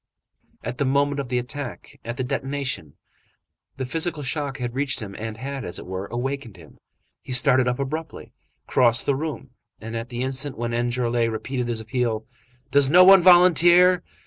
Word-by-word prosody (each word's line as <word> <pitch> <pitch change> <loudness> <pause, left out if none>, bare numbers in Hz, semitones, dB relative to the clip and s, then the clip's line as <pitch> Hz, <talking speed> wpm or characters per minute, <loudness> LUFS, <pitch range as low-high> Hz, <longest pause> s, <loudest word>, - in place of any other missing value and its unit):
At 120 +2 -6
the 140 - +1
moment 140 +1 +1
of 135 -3 -5
the 125 - 0
attack, 125 +2 -6
at 120 +1 -6
the 130 - -2
detonation, 130 - -4 0.8
the 130 - -3
physical 160 +2 -2
shock 140 0 -2
had 120 -2 -4
reached 135 +1 -1
him 100 -4 -7
and 110 0 -6
had, 135 +2 -6
as 90 - -3
it - - -9
were, 95 +2 -5
awakened 125 -3 -5
him; 80 -3 -17 0.4
he - - -10
started 125 0 +4
up 125 0 0
abruptly, 155 +4 -6 0.3
crossed 120 -2 +3
the 140 - +1
room, 140 -3 -5 0.3
and 115 +1 -7
at 115 +1 -5
the 120 +1 -4
instant 130 +1 -2
when 120 0 -3
Enjolras 120 -1 0
repeated 125 +3 -4
his 115 -2 -2
appeal: 110 -1 -2 0.5
"Does 140 -1 +5
no 180 +4 +7
one 190 0 +8
volunteer?" 180 0 +6
130 Hz, 175 wpm, -23 LUFS, 120-145 Hz, 0.8 s, one